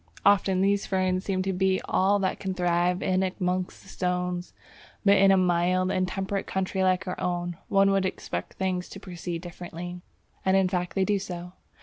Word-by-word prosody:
Often 195 -2 +4
these 200 +1 +2
ferns 185 -1 0
seem 185 -2 -1
to 190 0 -1
be 190 0 +2
all 195 +2 +3
that 190 -2 -1
can 190 -1 -3
thrive 175 +1 +1
in 185 0 +2
amongst 185 -1 -2
the - - -18
stones. 180 -1 -2 0.5
But 200 0 +6
in 195 0 +6
a 195 - +6
mild 180 +1 +2
and 185 0 +1
temperate 195 +2 -3
country 190 0 -1
like 185 0 +2
our 180 - -4
own, 175 -1 -2
one 195 0 +4
would 195 -1 +2
expect - - -5
things 185 -1 -2
to 195 - -9
proceed 175 -3 -6
differently. 175 0 -7 0.4
And 190 0 +3
in 190 -1 +3
fact 180 -1 -2
they 190 -1 +2
do 205 0 +1
so. 180 -1 -7
185 Hz, 190 wpm, -27 LUFS, 180-195 Hz, 0.5 s, But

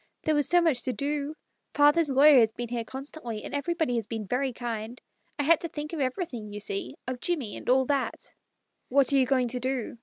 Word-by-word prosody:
"There 315 - +1
was 295 -1 +3
so 350 0 +6
much 315 -7 +2
to 255 - -2
do. 290 +2 -3 0.4
Father's 295 +2 +4
lawyer 275 +1 +7
has 225 -2 +4
been 240 +1 -6
here 235 -1 -2
constantly, 260 -3 -7
and - - -8
I 245 - -3
had 330 +2 +4
to 335 - -3
think 300 0 -7
of 325 - -3
everything, 255 - -3
you 205 - -6
see 200 -1 -4
— - - -52
of 255 -1 -3
Jimmie, 295 -12 -1
and - - -7
all 260 +1 +4
that." 280 0 -2 0.3
" - - -51
What 275 +1 +3
are - - +4
you 260 -1 +3
going 255 -3 +2
to 250 +1 -2
do 255 -2 -3
265 Hz, 205 wpm, -27 LUFS, 240-295 Hz, 0.4 s, lawyer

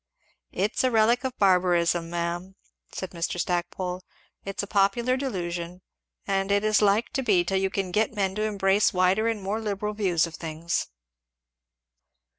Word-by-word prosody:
"It's 205 +7 -1
a 255 - +3
relic 230 +2 +3
of 260 -1 -4
barbarism, 175 -3 +2
ma'am," 175 +2 -3 0.4
said 190 - -6
Mr. 170 0 -3
Stackpole; 180 +1 -2 0.4
"it's 195 +1 -4
a - - -3
popular 200 +6 +2
delusion 180 -8 -4 0.4
and 195 0 0
it 200 0 +2
is 215 0 +3
like 210 +3 +2
to 270 - 0
be, 200 -8 +3
till 190 +2 0
you 190 0 0
can 190 -1 -3
get 215 +4 +1
men 195 -2 0
to 210 - -3
embrace 205 -1 +2
wider 185 +5 +3
and 220 -3 -2
more 205 +4 -2
liberal 210 0 -2
views 185 -6 +1
of 165 - -9
things." 165 +1 -3
195 Hz, 160 wpm, -26 LUFS, 175-210 Hz, 0.4 s, a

